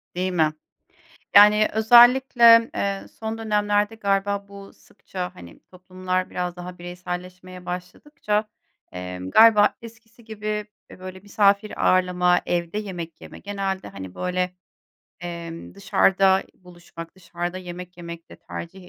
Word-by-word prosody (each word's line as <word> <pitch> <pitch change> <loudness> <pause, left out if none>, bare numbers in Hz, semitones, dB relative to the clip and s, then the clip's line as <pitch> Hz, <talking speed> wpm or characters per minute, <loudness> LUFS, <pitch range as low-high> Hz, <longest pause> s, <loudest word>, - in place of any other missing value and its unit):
Değil 185 +1 -1
mi? 155 -3 +1 0.8
Yani, 210 +1 +7
özellikle, 235 +1 +6
eee, 195 -1 -3
son 220 0 -4
dönemlerde 210 -1 0
galiba 200 -1 -1
bu 200 0 -12
sıkça, 180 -1 -9
hani, 85 -1 -14
toplumlar 185 0 -4
biraz 180 0 -4
daha 180 0 -9
bireyselleşmeye 180 +1 -8
başladıkça, 210 +4 -4 0.4
emm, 90 +1 -7
galiba 220 -2 +6
eskisi 230 0 -15
gibi, 215 -1 -9 0.4
eee, - - -13
böyle, 185 0 -9
misafir 205 +1 +1
ağırlama, 180 -1 +3
evde 175 +3 -2
yemek 175 -6 -7
yeme, - - -12
genelde, 195 -1 -4
hani, 95 -2 -10
böyle, 180 0 -2 0.7
emm, 170 -1 -8
dışarıda 195 -1 +2
buluşmak, 175 -2 -13
dışarıda 175 -1 -6
yemek 180 0 -9
yemek 170 -1 -10
de - - -12
tercih 180 +1 -10
185 Hz, 120 wpm, -23 LUFS, 180-210 Hz, 0.8 s, Yani